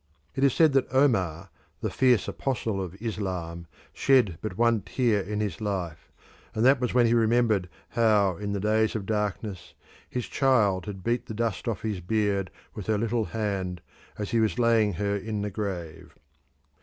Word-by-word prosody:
It 135 - -2
is 140 -3 +4
said 160 -4 +5
that 135 -1 +2
Omar, 95 - +1 0.3
the - - -2
fierce 125 -4 +3
apostle 115 -7 -2
of 95 +1 -7
Islam, 90 -6 -4 0.3
shed 125 -12 +3
but 105 -4 -5
one 115 -2 +3
tear 115 -4 +1
in 105 +2 -3
his 105 -2 -3
life, 90 -7 -4 0.4
and 110 +2 +2
that 135 0 +5
was 125 - 0
when 120 -1 +4
he 115 - +3
remembered 110 -5 +2 0.2
how 105 -5 +3
in 100 0 -4
the 100 - -1
days 110 +2 +1
of 105 -3 -3
darkness 105 -2 -3 0.3
his 125 -1 -3
child 105 -9 +2
had 95 -3 -6
beat 120 +1 -1
the 110 - -6
dust 110 -4 -2
off 115 -5 -2
his 105 -4 -2
beard 100 -1 0 0.2
with 105 - -7
her 110 -1 +2
little 115 +1 0
hand 100 -5 -3 0.4
as 105 -2 -4
he 115 - +2
was 110 +1 +1
laying 115 -4 +3
her 100 +3 -1
in 105 +1 -3
the 105 - -3
grave. 95 -6 -5
105 Hz, 180 wpm, -27 LUFS, 95-115 Hz, 0.4 s, said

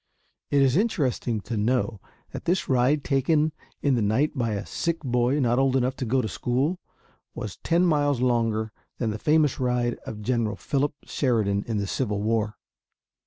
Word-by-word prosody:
It 140 -1 +4
is 135 +2 +3
interesting 135 - 0
to 115 - -5
know 115 -1 0 0.3
that - - -7
this 180 +2 +1
ride 135 +3 +2
taken 150 +3 +2 0.3
in 140 - +3
the 120 - +1
night 110 +10 +1
by 115 -4 0
a 100 +1 -3
sick 170 -1 -1
boy 125 0 +1
not 120 -2 +2
old 135 -1 +2
enough 130 0 +1
to 130 - -3
go 130 +2 +1
to - - -1
school 130 - -1 0.6
was 105 - -6
ten 170 +2 +2
miles 145 -5 +2
longer 115 -3 +1 0.3
than 115 -3 -1
the 105 - -5
famous 150 -1 +2
ride 125 -1 0
of 105 -1 -6
General 115 -3 0
Philip 140 +6 -1
Sheridan 105 -7 0
in 115 -2 -1
the 100 - -1
Civil 105 0 -1
War. 110 -1 0
125 Hz, 175 wpm, -25 LUFS, 110-140 Hz, 0.6 s, It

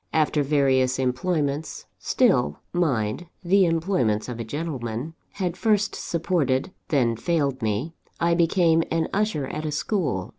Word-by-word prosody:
After 155 -1 +2
various 135 -3 +2
employments 145 +3 -1
still, 75 0 +2 0.2
mind, 145 -4 0 0.2
the 190 +1 +4
employments 160 - 0
of 120 -2 -6
a - - -2
gentleman! 130 0 -4 0.2
had 180 -3 -2
first 210 +1 +1
supported, 165 -3 0 0.2
then 120 -6 +2
failed 140 -1 0
me, 110 +9 -1 0.3
I 170 0 +2
became 170 -1 +3
an 165 0 0
usher 205 -8 0
at 155 +3 -5
a 155 - -2
school. 150 - -1
150 Hz, 135 wpm, -24 LUFS, 130-170 Hz, 0.3 s, the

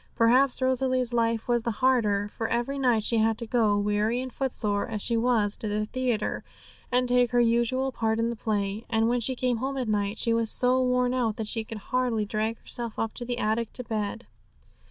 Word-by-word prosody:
Perhaps 255 +3 +3
Rosalie's 255 -1 +1
life 230 -1 0
was 240 -1 +2
the 235 - -2
harder, 220 -6 +2
for 225 +2 -4
every 240 +4 -1
night 245 -5 +2
she 230 +1 +1
had 220 0 +2
to 235 - -4
go, 220 -3 +2
weary 210 +3 0
and 255 -1 -5
footsore 210 -6 -1
as 220 -3 -4
she 235 +3 0
was, 225 -3 +2
to 220 - -5
the 210 +1 -1
theatre, 245 -2 -2 0.5
and 250 0 +2
take 245 0 +3
her 245 - +2
usual 240 +3 +2
part 225 -2 -1
in 230 +1 0
the - - -4
play. 210 -1 -2
And 225 0 +2
when 245 +1 +1
she 255 +3 -2
came 250 -1 0
home 270 +3 -3
at 255 -3 -2
night, 205 0 -1
she 230 - +1
was 230 -1 +1
so 255 +2 +3
worn 250 0 +1
out 235 -4 0
that 220 -1 -4
she 225 +1 0
could 220 0 -8 0.2
hardly 245 -4 +1
drag 215 +2 -2
herself 235 -2 -6
up 225 -1 -2
to 240 - -7
the 245 0 -3
attic 220 0 -1
to 250 - -5
bed. 220 0 -3
230 Hz, 215 wpm, -27 LUFS, 220-250 Hz, 0.5 s, Perhaps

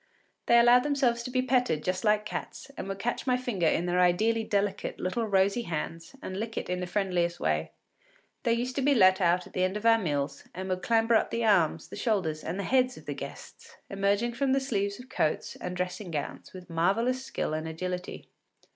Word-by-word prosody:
They 235 - +6
allowed 240 +1 +6
themselves 265 -4 +1
to 235 - -6
be 255 0 0
petted 250 - +1
just 185 0 -1
like 210 -1 +2
cats, 265 +5 -6
and - - -6
would 195 0 -4
catch 240 +6 -3
my 250 -1 +3
finger 225 -10 -1
in 170 - +1
their 180 0 +1
ideally 215 +6 +3
delicate 205 -2 -1
little 220 +5 -1
rosy 195 +3 +2
hands, 165 - -5
and 185 +1 -5
lick 225 +1 -5
it - - -3
in 180 - -1
the 180 - -3
friendliest 180 -3 0
way. 80 0 0 0.7
They 230 - +2
used 245 +2 -2
to - - +1
be 280 +1 +3
let 190 -3 +5
out 180 0 +2
at - - -15
the 185 - 0
end 185 +2 0
of 210 - -8
our 225 0 +6
meals, 145 -6 -2
and 190 +1 -5
would 185 0 -1
clamber 225 +3 +2
up 220 - +3
the 230 0 -1
arms, 170 -6 +2
the - - -8
shoulders, 180 -10 -1
and 170 +3 -4
the - - -1
heads 255 +2 +2
of - - -13
the - - -3
guests, - - -10 0.2
emerging 200 +4 +1
from 265 +2 +1
the 270 - +3
sleeves 200 -6 -2
of 250 - -11
coats 155 -11 -1
and 180 0 -5
dressing 180 +1 -3
gowns 150 -3 -5
with 180 -1 -11
marvellous 210 +10 +1
skill 155 - -3
and 155 +1 -3
agility. 180 +3 -5
200 Hz, 220 wpm, -28 LUFS, 180-235 Hz, 0.7 s, They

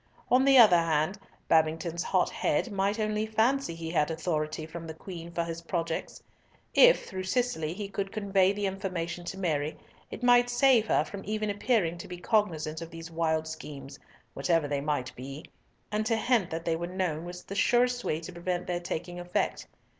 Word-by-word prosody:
On 255 +2 +5
the 275 -1 +6
other 210 -8 +8
hand, 165 +4 0 0.3
Babington's 165 +1 +2
hot - - +1
head 240 - 0
might 200 +1 0
only 215 0 0
fancy 220 -2 +1
he 165 -1 -5
had 150 -2 +2
authority 155 -1 -2
from 165 +1 -8
the 160 - -7
Queen 170 0 -8
for 170 0 -1
his 165 0 -5
projects. 165 -1 -3 0.5
If, - - +6
through 185 -2 -5
Cicely, 185 -8 0
he 205 0 -4
could 195 -1 -4
convey 195 -3 +2
the 205 0 -2
information 180 -3 -3
to 190 - -5
Mary, 155 -5 -1 0.3
it - - -8
might 245 0 +5
save 245 -2 +4
her - - +3
from 200 - -7
even 215 +1 -1
appearing 200 -5 0
to - - -8
be 180 - -7
cognisant 170 -6 0
of 165 - -6
these 165 0 -9
wild 160 -1 0
schemes, 140 -3 -8 0.3
whatever 155 +2 +1
they 140 -1 -1
might 145 -4 -2
be, 135 +4 -8 0.5
and 210 +1 0
to 225 - +2
hint 225 -6 +2
that 165 +1 -5
they 165 - +1
were 170 +1 -3
known 180 -4 -2
was 175 +1 -8
the - - -8
surest 245 +4 +2
way 155 - -1
to 180 +2 -8
prevent 175 +1 -3
their 175 -1 -2
taking 175 +1 -5
effect. 175 0 -2
175 Hz, 190 wpm, -29 LUFS, 160-210 Hz, 0.5 s, other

